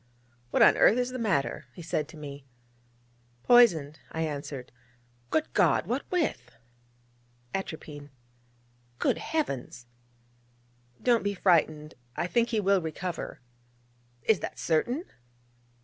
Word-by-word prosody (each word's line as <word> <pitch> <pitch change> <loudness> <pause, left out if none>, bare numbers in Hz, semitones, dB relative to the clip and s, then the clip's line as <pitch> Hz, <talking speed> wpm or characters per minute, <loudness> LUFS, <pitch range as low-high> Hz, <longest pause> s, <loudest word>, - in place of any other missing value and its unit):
'What - - +4
on - - +6
earth 225 - +6
is 250 0 0
the 255 - -5
matter?' 180 - 0
he 175 - -9
said 155 -2 -1
to 160 - -13
me. 140 -2 -8 1.0
'Poisoned,' 170 -12 +5
I 160 - -3
answered. 140 -4 -5 0.6
'Good 315 - 0
God! - - +3
what - - -3
with?' 355 -4 -2 1.0
'Atropine.' 150 -6 -6 0.9
'Good - - +1
Heavens!' 140 - -3 1.2
'Don't 240 -2 +4
be 200 0 -1
frightened: 155 -4 +2 0.2
I - - -1
think 235 +6 +1
he 225 - +1
will 195 -1 +3
recover.' 170 0 -5 0.8
'Is 220 -3 +3
that - - -6
certain?' 240 - 0
175 Hz, 115 wpm, -28 LUFS, 150-230 Hz, 1.2 s, on